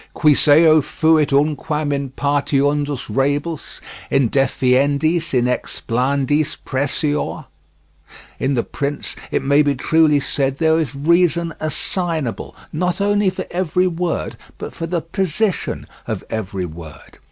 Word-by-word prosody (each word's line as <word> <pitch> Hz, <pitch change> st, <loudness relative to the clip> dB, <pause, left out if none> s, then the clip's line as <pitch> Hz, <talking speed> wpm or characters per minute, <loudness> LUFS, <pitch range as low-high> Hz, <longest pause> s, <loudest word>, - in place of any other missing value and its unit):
Quis 150 Hz, -2 st, +4 dB
eo 155 Hz, +1 st, +6 dB
fuit 155 Hz, +1 st, +2 dB
unquam 150 Hz, +1 st, 0 dB
in 140 Hz, -1 st, -2 dB
partiundis 145 Hz, 0 st, 0 dB
rebus, 145 Hz, +7 st, -2 dB, 0.3 s
in 135 Hz, -5 st, +2 dB
definiendis, 140 Hz, +5 st, +1 dB
in 125 Hz, -2 st, +2 dB
explanandis 135 Hz, +4 st, 0 dB
pressior? 145 Hz, +2 st, -2 dB, 0.9 s
In 135 Hz, +1 st, 0 dB
The 120 Hz, -, +1 dB
Prince, 145 Hz, 0 st, -4 dB
it -, -, -1 dB
may 140 Hz, +2 st, +4 dB
be 145 Hz, -1 st, +1 dB
truly 155 Hz, +2 st, +3 dB
said, 135 Hz, -1 st, -1 dB
there 160 Hz, +1 st, +3 dB
is 145 Hz, -5 st, -3 dB
reason 170 Hz, +2 st, +2 dB
assignable, 155 Hz, -2 st, -3 dB, 0.2 s
not 180 Hz, +4 st, -1 dB
only 205 Hz, 0 st, +2 dB
for -, -, -5 dB
every 180 Hz, 0 st, 0 dB
word, 175 Hz, -1 st, -2 dB, 0.2 s
but -, -, -7 dB
for 165 Hz, -, -5 dB
the 170 Hz, 0 st, -1 dB
position 190 Hz, +4 st, -1 dB, 0.2 s
of -, -, -3 dB
every 100 Hz, -4 st, -3 dB
word. 80 Hz, -2 st, -12 dB
145 Hz, 125 wpm, -19 LUFS, 135-165 Hz, 0.9 s, eo